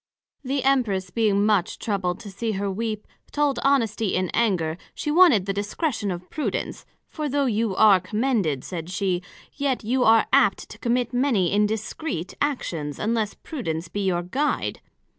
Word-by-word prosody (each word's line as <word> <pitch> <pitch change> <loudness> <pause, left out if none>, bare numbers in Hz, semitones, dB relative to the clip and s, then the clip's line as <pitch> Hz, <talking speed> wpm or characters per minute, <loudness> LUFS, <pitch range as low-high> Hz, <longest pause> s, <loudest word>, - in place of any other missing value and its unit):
The 270 0 -1
Empress 215 -9 +1
being 205 -3 +2
much 205 -5 +1
troubled 190 -4 -2
to 205 - -9
see 220 +3 -2
her 200 0 -2
weep, 215 +1 -3 0.3
told 290 -4 +1
Honesty 230 -7 +2
in 185 -1 0
anger, 180 -8 +1 0.2
she 300 - -2
wanted 305 - +6
the 195 - -1
discretion 205 - -2
of 180 0 -5
Prudence; 305 - -3 0.2
for 305 -2 -4
though 280 +1 +1
you 225 -4 0
are 205 -3 +6
commended, 195 - 0
said 170 -2 -6
she, 185 -1 -1 0.3
yet 275 -4 -1
you 250 +4 +1
are 225 -1 +5
apt - - +3
to - - -11
commit 245 0 0
many 245 -8 +2
indiscreet 210 - -1
actions, 165 - -2
unless 220 -1 -1
Prudence 170 - -5
be 205 - -3
your 175 -2 0
guide. 275 +12 -1
215 Hz, 160 wpm, -24 LUFS, 185-255 Hz, 0.3 s, wanted